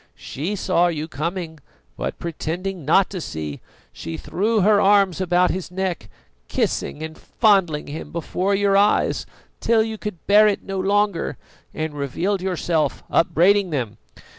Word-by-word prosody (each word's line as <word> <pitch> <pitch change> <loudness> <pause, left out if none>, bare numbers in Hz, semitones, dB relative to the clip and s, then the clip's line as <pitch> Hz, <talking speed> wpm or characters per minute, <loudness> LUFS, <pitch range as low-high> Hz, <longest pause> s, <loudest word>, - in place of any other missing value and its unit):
She 170 +10 -4
saw 180 -2 +2
you 160 -2 -3
coming, 165 +1 -4 0.4
but - - -4
pretending 170 +2 -4
not 180 +6 +4
to 185 -3 -4
see, 75 - -5 0.3
she 80 -1 -6
threw 205 - 0
her 205 +1 +4
arms 195 -3 +4
about 180 0 +3
his 185 0 -4
neck, 180 - -3 0.4
kissing 155 - -2
and 160 0 -6
fondling 190 -9 +2
him 150 +3 -7
before 180 +4 -1
your 200 0 +2
eyes, 205 +1 +2 0.3
till 225 -1 +3
you 220 -1 -5
could 210 -4 -5
bear 210 +2 +6
it 205 - 0
no 195 -1 -4
longer, 200 -1 +1 0.3
and 155 -1 -4
revealed 170 +8 -2
yourself, 175 -4 -1
upbraiding 185 +4 +3
them. 125 -9 -3
180 Hz, 145 wpm, -22 LUFS, 160-200 Hz, 0.4 s, bear